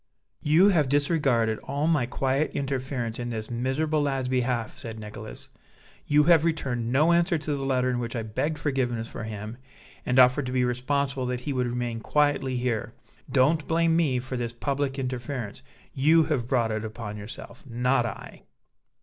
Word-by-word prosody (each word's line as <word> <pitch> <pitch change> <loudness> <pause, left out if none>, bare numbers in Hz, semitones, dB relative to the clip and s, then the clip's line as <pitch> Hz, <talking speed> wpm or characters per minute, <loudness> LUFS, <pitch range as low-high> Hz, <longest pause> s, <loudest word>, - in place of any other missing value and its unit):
"You 165 +7 +5
have 155 -8 +2
disregarded 140 -6 +2
all 140 +2 -2
my 150 -7 +2
quiet 135 +4 0
interference 130 -4 -2
in 120 0 -3
this 110 -1 -5
miserable 140 +6 0
lad's 135 -3 -1
behalf," 125 -3 -1
said 110 -1 -7
Nicholas; 105 - -8 0.6
"you 150 +1 +5
have 165 -1 +5
returned 125 -8 -1
no 150 +6 +4
answer 170 0 +3
to 150 -1 -2
the 135 - -4
letter 130 -1 +1
in 125 - -1
which 120 0 -4
I 115 - -2
begged 145 +9 -2
forgiveness 130 -6 -1
for 115 - -7
him 110 +1 -6 0.5
and 125 - 0
offered 130 +2 +5
to - - -3
be 125 -1 +2
responsible 130 +1 -1
that 125 0 -2
he 140 +2 -3
would 125 -1 0
remain 120 -1 -2
quietly 145 0 +1
here. 120 -3 -2 0.4
Don't 150 +4 +3
blame 165 0 +2
me 155 -7 +2
for 130 +1 -4
this 120 -2 -3
public 140 +2 -2
interference. 125 -3 -4 0.3
You 160 +4 +5
have 145 -6 -1
brought 120 -4 +1
it 110 0 -2
upon 110 -1 -6
yourself; 105 +3 -9
not 125 +1 +1
I." 110 - -9
130 Hz, 175 wpm, -26 LUFS, 120-145 Hz, 0.6 s, You